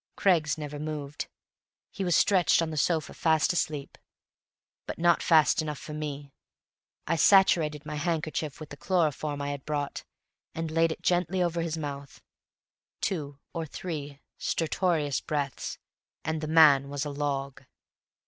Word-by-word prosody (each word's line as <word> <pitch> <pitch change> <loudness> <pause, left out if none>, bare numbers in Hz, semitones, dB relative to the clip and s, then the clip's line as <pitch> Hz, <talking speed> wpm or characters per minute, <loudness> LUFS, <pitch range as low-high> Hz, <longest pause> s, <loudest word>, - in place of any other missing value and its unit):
Craggs 160 -7 +2
never 150 -1 -6
moved; 150 -1 -5 0.6
he 195 - -4
was 175 -3 +2
stretched 185 -4 +4
on 160 - -3
the - - -4
sofa 155 +1 0
fast 160 0 +2
asleep. 150 -4 -3 0.9
But - - -5
not 170 0 +3
fast 155 -3 +4
enough 150 -2 -4
for 155 - -8
me. 145 -2 -5 0.7
I 165 - +1
saturated 160 -4 +4
my 150 0 -4
handkerchief 155 -2 -2
with 155 - -9
the 145 - -9
chloroform 150 -3 0
I 140 - -2
had 140 -1 -6
brought, 145 -2 -3 0.5
and 165 -1 -3
laid 165 0 +3
it - - -7
gently 180 +1 +1
over 170 -1 0
his 165 -1 -2
mouth. 140 -3 -6 0.8
Two 145 -7 -3 0.2
or 165 -2 -3
three 145 -4 -6 0.2
stertorous 160 -3 0
breaths, 145 -3 -3 0.5
and 160 0 -1
the 155 - -3
man 150 -4 +6
was 145 0 -3
a 145 - -3
log. 140 -2 -3
155 Hz, 150 wpm, -28 LUFS, 145-165 Hz, 0.9 s, man